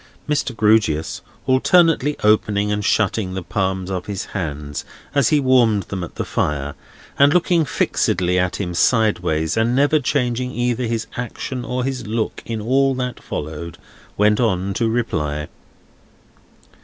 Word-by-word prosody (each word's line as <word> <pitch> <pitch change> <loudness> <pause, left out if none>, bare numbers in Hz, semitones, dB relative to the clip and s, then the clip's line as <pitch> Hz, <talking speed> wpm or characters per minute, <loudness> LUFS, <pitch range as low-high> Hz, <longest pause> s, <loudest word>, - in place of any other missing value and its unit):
Mr. 145 -4 -1
Grewgious, 105 -8 +2 0.2
alternately 150 +2 +3
opening 105 -1 +2
and 105 0 -1
shutting 100 -2 +1
the 95 - -4
palms 95 0 -2
of 90 -2 -4
his 100 -2 -4
hands 75 -6 -4 0.3
as 140 -5 +3
he 150 - +4
warmed 120 -6 +3
them 95 -3 -5
at 85 - -8
the - - -3
fire, 75 -1 -1 0.5
and 140 +3 +5
looking 175 -2 +3
fixedly 90 -8 +1
at 90 0 0
him 90 -3 -3
sideways, 90 -7 +1
and 115 +2 +1
never 145 +3 +3
changing 125 -3 0
either 120 -1 -1
his 115 -1 -2
action 125 +1 -4
or 125 +2 -2
his 130 -3 -3
look 110 0 -2
in 115 -1 -3
all 135 +4 +2
that 125 -1 -4
followed, 80 +3 -6 0.4
went 105 +1 +3
on 100 -5 0
to 115 +3 0
reply. 75 -11 -2
110 Hz, 145 wpm, -20 LUFS, 90-125 Hz, 0.5 s, and